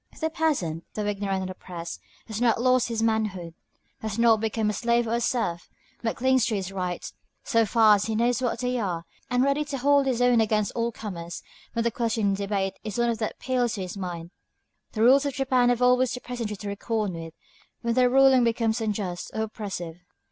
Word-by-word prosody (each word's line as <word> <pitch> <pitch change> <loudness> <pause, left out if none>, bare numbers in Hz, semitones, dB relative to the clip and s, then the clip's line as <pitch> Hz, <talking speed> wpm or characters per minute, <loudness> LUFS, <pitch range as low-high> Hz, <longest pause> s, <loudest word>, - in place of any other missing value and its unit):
The 320 0 -1
peasant, 270 - -1
though 210 - -2
ignorant 195 -2 -1
and 185 - -4
oppressed, 170 -2 -8 0.2
has 220 0 -5
not 235 -2 +3
lost 255 0 +3
his 230 -1 -2
manhood; 210 -7 -1 0.5
has 220 -1 -4
not 230 -2 +5
become 220 -1 0
a - - -5
slave 235 +3 +1
or 225 - -1
a 235 - +1
serf, 225 -9 -1 0.3
but 225 - -1
clings 260 0 +3
to 225 - 0
his 195 -1 -3
rights, 180 -2 -4 0.3
so 230 -2 +2
far 220 +1 +6
as 205 -1 +2
he 220 0 -2
knows 240 +3 +1
what 245 -2 0
they 250 0 0
are; 175 -6 -2 0.2
and 250 +1 +2
is - - +3
ready 280 +2 +1
to 285 -2 -4
hold 280 +1 +3
his 250 -3 0
own 245 -2 +4
against 215 -1 +1
all 235 0 -1
comers, 175 -7 -7 0.3
when 230 - 0
the 235 - +1
question 225 -3 0
in - - +2
debate 195 -1 -2
is 215 -1 -5
one 240 0 +2
that 220 -1 -3
appeals 245 -3 -1
to 200 - -5
his 180 0 -5
mind. 175 -3 -6 0.6
The 220 - 0
rulers 270 +4 +6
of 275 - -4
Japan 255 -3 +2
have 245 0 +1
always 250 0 +4
the 250 - -4
peasantry 235 -4 -4
to 205 +1 -6
reckon 210 -1 -2
with 165 -1 -7 0.5
when 235 0 +1
their 250 0 +4
ruling 265 -1 +6
becomes 230 -1 +1
unjust 200 -5 -3
or 220 - 0
oppressive. 195 -6 -6
225 Hz, 215 wpm, -26 LUFS, 200-245 Hz, 0.6 s, far